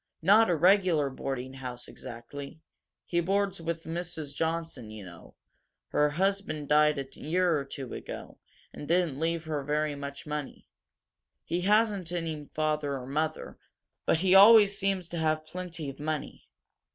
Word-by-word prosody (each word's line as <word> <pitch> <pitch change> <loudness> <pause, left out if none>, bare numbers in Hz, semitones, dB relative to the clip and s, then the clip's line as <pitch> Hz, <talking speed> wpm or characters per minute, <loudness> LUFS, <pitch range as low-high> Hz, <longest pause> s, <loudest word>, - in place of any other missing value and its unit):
Not 210 +5 +6
a 175 - +3
regular 175 -4 +4
boarding 130 -1 -4
house, 125 -2 -7
exactly. 140 +6 -9 0.5
He 170 - 0
boards 195 +1 0
with 165 0 -3
Mrs. 165 -3 -4
Johnson, 160 -8 -3
you 110 -2 -9
know. 85 -2 -13 0.5
Her 150 0 +3
husband 180 -3 -1
died 150 0 +4
a 135 - -3
year 175 +2 +1
or 145 - -1
two 135 -2 -7
ago, - - -8 0.3
and 145 - -8
didn't 170 -5 +1
leave 165 0 -1
her 150 -3 -2
very 150 +1 0
much 140 0 -7
money. 150 -2 -5 0.8
He 175 +1 -2
hasn't 205 -2 +2
any 160 -4 -4
father 150 -2 0
or 125 - -7
mother, 155 +4 -3 0.5
but - - +4
he 185 -1 +3
always 205 0 +8
seems 195 -3 -1
to 170 - -4
have 155 -1 0
plenty 170 -2 -6
of 135 - -17
money. 155 0 -4
155 Hz, 150 wpm, -29 LUFS, 145-180 Hz, 0.8 s, always